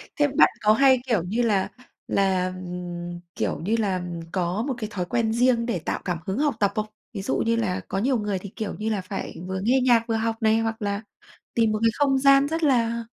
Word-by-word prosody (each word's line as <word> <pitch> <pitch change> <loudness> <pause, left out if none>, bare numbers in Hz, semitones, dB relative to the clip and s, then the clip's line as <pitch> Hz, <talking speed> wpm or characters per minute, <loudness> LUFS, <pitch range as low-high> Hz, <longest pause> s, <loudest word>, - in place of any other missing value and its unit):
Thế 290 -1 +3
bạn 275 - +5
có 215 0 +5
hay, 260 +1 +5
kiểu 215 -9 +1
như 215 +7 -1
là 205 -5 +1 0.4
là 190 -2 +1
ừm, 175 -1 -6 0.2
kiểu - - -1
như 205 +8 0
là 190 -4 0 0.3
có 185 +4 -1
một 270 - 0
cái 215 -2 -4
thói 180 -3 -3
quen 225 +1 0
riêng, 240 0 +3
để 230 -7 -1
tạo - - -3
cảm 175 -3 -1
hứng 190 +4 -2
học 290 -5 +1
tập 200 -1 +2
không? 215 0 0 0.3
Ví 195 - -4
dụ - - -1
như 230 0 +1
là 205 -6 -1
có - - -3
nhiều 250 +5 +2
người 205 -3 -2
thì, 200 - -8
kiểu 215 -3 -4
như 220 - -1
là, 210 -4 -1
phải 195 +1 -6
vừa 190 0 -3
nghe 255 +5 +3
nhạc 235 -2 +5
vừa 225 - 0
học 225 0 0
này, 220 0 +3
hoặc 225 -1 -2
là 200 0 -1 0.5
tìm 225 -2 +2
một 215 - -1
cái 230 - +4
không 275 -2 +2
gian 275 +1 +5
rất 325 +2 -2
là 235 -4 +2
220 Hz, 235 wpm, -24 LUFS, 195-235 Hz, 0.5 s, bạn